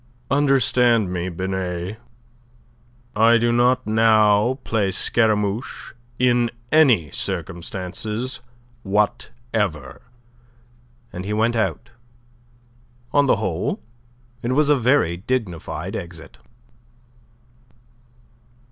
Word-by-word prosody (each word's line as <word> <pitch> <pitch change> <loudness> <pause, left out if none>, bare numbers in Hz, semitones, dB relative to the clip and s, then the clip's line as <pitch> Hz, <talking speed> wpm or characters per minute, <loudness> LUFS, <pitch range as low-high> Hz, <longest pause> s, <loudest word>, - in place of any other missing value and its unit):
"Understand 125 -7 +3
me, 90 0 -2
Binet. 95 +2 -4 1.2
I 115 +2 +5
do 120 +1 +1
not 125 +2 +2
now 110 +2 +3
play 105 -4 0
Scaramouche 110 +2 -1 0.2
in 120 -1 +2 0.2
any 125 - +4
circumstances 95 +7 -5 0.4
whatever." 105 - -2 1.1
And 90 - -5
he 105 +2 -3
went 115 +2 +1
out. 115 +1 -2 1.2
On 145 -1 +4
the - - +4
whole, 90 -2 -2 0.6
it 120 +2 -1
was 150 +1 +3
a - - +6
very 125 - +2
dignified 105 -5 -4
exit. 85 -1 -9
110 Hz, 85 wpm, -21 LUFS, 95-120 Hz, 1.2 s, a